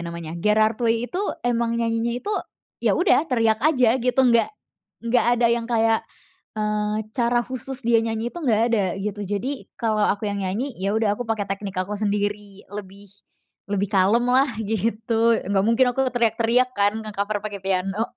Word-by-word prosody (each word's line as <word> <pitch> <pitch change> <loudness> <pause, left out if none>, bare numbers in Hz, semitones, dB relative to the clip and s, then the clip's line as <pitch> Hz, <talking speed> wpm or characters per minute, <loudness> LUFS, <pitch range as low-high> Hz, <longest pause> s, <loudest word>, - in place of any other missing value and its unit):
namanya, 170 -1 -6
Gerard 215 +4 +2
Way 230 +1 +1
itu 365 - -2 0.2
emang 235 -1 +1
nyanyinya 230 0 0
itu, 420 - -3 0.5
ya - - +3
udah 340 -3 +3
teriak 225 -3 +2
aja 255 -6 +4
gitu, 250 +2 +2
nggak 235 -3 +4 0.5
nggak 235 +1 +2
ada 235 0 +3
yang 235 -1 -1
kayak, 225 -1 +2 0.6
eee, 210 0 -1 0.2
cara 240 -1 +1
khusus 260 +1 -5
dia 235 -1 +4
nyanyi 225 +1 -2
itu - - -7
nggak 230 -7 +2
ada, 210 -4 +2 0.2
gitu. 210 0 -4
Jadi 240 +8 -3
kalau 215 -2 +1
aku 205 +2 -1
yang 200 - -3
nyanyi, 205 +9 -2
ya 195 +2 0
udah 220 -2 +2
aku 245 - -4
pakai 220 -2 -1
teknik 195 -1 -4
aku 185 +3 -2
sendiri 205 -1 -2
lebih 200 -1 -9 0.6
lebih 200 0 0
kalem 205 +5 +3
lah, 265 +2 +5 0.2
gitu. 225 +2 +1
Nggak 195 -1 +2
mungkin 230 +3 +4
aku 265 +1 +1
teriak-teriak 235 +1 +2
kan, 205 +2 +1
nge-cover 210 0 -2
pakai 205 -2 -6
piano. 195 +2 -1
225 Hz, 170 wpm, -23 LUFS, 205-235 Hz, 0.6 s, lah